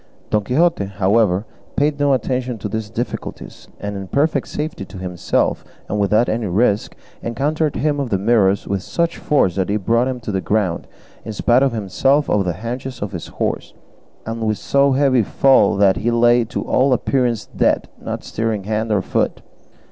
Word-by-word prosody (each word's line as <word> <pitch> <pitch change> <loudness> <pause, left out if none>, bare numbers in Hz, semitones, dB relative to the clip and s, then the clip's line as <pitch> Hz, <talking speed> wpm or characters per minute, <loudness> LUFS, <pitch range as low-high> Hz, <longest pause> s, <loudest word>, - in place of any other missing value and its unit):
Don 105 -1 +2
Quixote, 145 0 +2
however, 100 +1 +1 0.3
paid 145 0 +1
no 145 -1 +3
attention 125 -1 -1
to 105 - -4
these 110 +1 -4
difficulties, 115 +3 -6
and 105 0 -4
in 95 -1 -6
perfect 140 - +1
safety 150 -8 -4
to 95 - -11
himself 90 -1 -1 0.2
and 105 - -2
without 105 +4 +3
any 110 -1 -1
risk 100 +2 +1 0.3
encountered 150 +6 -1
him 145 0 0
of 135 -3 -2
the 100 - +1
Mirrors 100 -1 +2
with 100 -1 -1
such 170 - -1
force 135 -12 +2
that 95 -1 0
he 105 - +1
brought 115 +5 +1
him 130 -1 -3
to 110 - -4
the 95 -1 -1
ground 95 -4 -1 0.4
in 110 - -6
spite 120 +4 +3
of 135 -1 +3
himself 135 +8 +1
over 105 - +3
the 90 -2 -1
haunches 125 +1 -5
of 105 - -4
his 85 -4 -6
horse, - - -3 0.5
and 115 +1 -4
with 110 -1 0
so 140 0 +2
heavy 135 -2 +3
a - - +3
fall 135 -1 +4
that 100 -1 +4
he 115 - 0
lay 120 0 +4
to 115 - -4
all 130 +1 +2
appearance 125 -3 0
dead, - - 0
not - - -5
stirring 110 -2 -2
hand 110 +2 -2
or 100 -3 +2
foot. - - -1
115 Hz, 185 wpm, -19 LUFS, 100-130 Hz, 0.5 s, fall